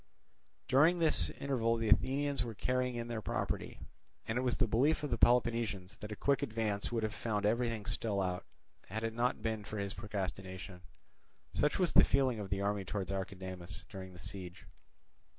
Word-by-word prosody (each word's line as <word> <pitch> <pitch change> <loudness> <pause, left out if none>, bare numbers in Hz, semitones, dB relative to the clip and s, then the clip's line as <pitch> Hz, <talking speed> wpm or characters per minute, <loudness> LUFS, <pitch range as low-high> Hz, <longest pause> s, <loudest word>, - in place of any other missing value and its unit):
During 150 +7 +5
this 165 -2 +4
interval 115 -4 0
the 115 -1 -1
Athenians 140 +5 +3
were 115 -2 -6
carrying 125 +3 0
in 120 0 -3
their 115 -2 -3
property; - - -3 0.5
and 110 - -1
it 125 - +1
was 125 -1 0
the 125 - +3
belief 135 +9 +2
of 145 - -2
the 115 - +1
Peloponnesians 115 -5 +2
that 105 +1 -7
a - - -3
quick 140 +5 +2
advance 110 -2 -1
would 115 -2 0
have 110 -1 -1
found 105 -3 -1
everything 115 -1 +1
still 105 -3 -1
out, 90 -1 -1 0.4
had 110 +4 -4
it 115 0 -1
not 120 +2 0
been 110 -2 -1
for 105 - -6
his 100 -1 -2
procrastination. 95 -3 -5 0.7
Such 150 - +2
was 180 -3 +2
the - - +9
feeling 130 -4 +2
of 100 -2 -5
the 100 -1 -1
army 100 0 0
towards 95 0 -3
Archidamus 95 -1 -5
during 95 -2 -8
the - - -11
siege. 95 0 -8
110 Hz, 185 wpm, -34 LUFS, 100-125 Hz, 0.7 s, the